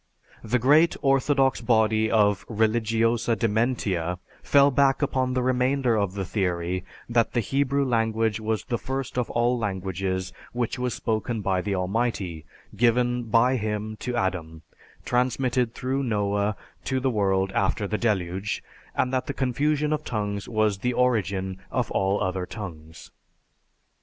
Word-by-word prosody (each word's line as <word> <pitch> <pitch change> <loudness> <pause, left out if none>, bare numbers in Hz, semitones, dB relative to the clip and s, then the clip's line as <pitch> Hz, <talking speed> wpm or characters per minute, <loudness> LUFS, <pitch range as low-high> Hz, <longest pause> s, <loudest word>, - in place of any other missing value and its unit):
The 115 +3 +1
great 150 +7 +4
orthodox 135 -1 +2
body 110 -2 +2
of 105 -3 +3
"religiosa 115 +1 +1
dementia" 105 -6 0 0.2
fell 140 0 +5
back 135 +1 +3
upon 130 -2 0
the 125 - +1
remainder 130 -1 +2
of 100 -3 0
the 95 -1 -2
theory 90 -2 -1 0.2
that 115 -1 +1
the 120 - +2
Hebrew 140 +4 +1
language 115 -3 +1
was 110 0 -2
the 120 -2 -2
first 135 0 -4
of 125 - -2
all 120 +1 +1
languages 95 -2 -2 0.2
which 120 0 -2
was 125 -1 -1
spoken 110 0 -2
by 95 -2 0
the 100 +1 -2
Almighty, 95 -4 -2 0.3
given 120 +2 +2
by 120 +4 +3
Him 110 -1 -3
to 125 +2 -4
Adam, 85 -6 -2 0.4
transmitted 125 -1 +1
through 130 +2 -1
Noah 105 -3 0 0.3
to 130 -1 0
the 130 0 0
world 95 -3 +1
after 100 +2 0
the 105 +1 -2
deluge, 95 -3 -1 0.3
and 130 - 0
that 130 - 0
the 140 - -3
confusion 145 +4 +1
of 155 0 -2
tongues 105 -5 -3
was 110 -3 +1
the 125 +4 0
origin 100 -7 0
of 125 - -1
all 95 +1 +1
other 95 -1 -2
tongues. 80 -7 -9
110 Hz, 145 wpm, -25 LUFS, 100-125 Hz, 0.4 s, fell